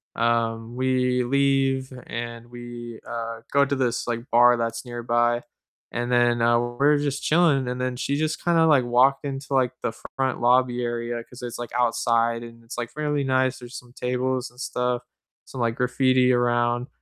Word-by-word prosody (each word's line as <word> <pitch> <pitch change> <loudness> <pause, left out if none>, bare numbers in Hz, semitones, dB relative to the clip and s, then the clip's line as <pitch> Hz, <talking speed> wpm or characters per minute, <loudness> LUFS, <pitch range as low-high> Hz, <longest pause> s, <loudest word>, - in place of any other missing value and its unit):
um, 115 0 0
we 125 -1 +1
leave 135 0 +1 0.2
and 120 0 -6
we, 120 -1 -9
uh, 115 -1 -5
go 140 0 +4
to 140 - -1
this, 125 -3 -1
like, 120 -1 -2
bar 120 +1 +6
that's 115 -1 -3
nearby. 120 0 0 0.5
And 120 +1 -3
then, 120 -1 +3
uh, 120 0 +4
we're 135 +5 +2
just 145 -1 -2
chilling 150 -5 +3
and 125 0 -3
then 125 0 -2
she 140 - -1
just 155 +1 -2
kinda, 170 -2 +4
like, 145 -5 +5
walked 130 +4 +3
into, 135 0 -5
like, 130 -1 +2
the - - 0 0.2
front 130 -2 -1
lobby 125 0 +3
area 120 0 -3
'cause 125 +1 -14
it's, 120 0 -6
like, 120 - -6
outside 115 -1 +1
and 115 0 -12
it's, 115 - -9
like, 120 -1 -4
fairly 150 -2 -1
nice, 130 -1 +1
there's 120 0 -9
some 125 0 -13
tables 125 +1 -2
and 125 +1 -21
stuff, 125 -2 -2 0.4
some, 130 - -7
like, 115 -1 0
graffiti 125 0 +3
around. 120 0 +1
125 Hz, 175 wpm, -24 LUFS, 120-130 Hz, 0.5 s, bar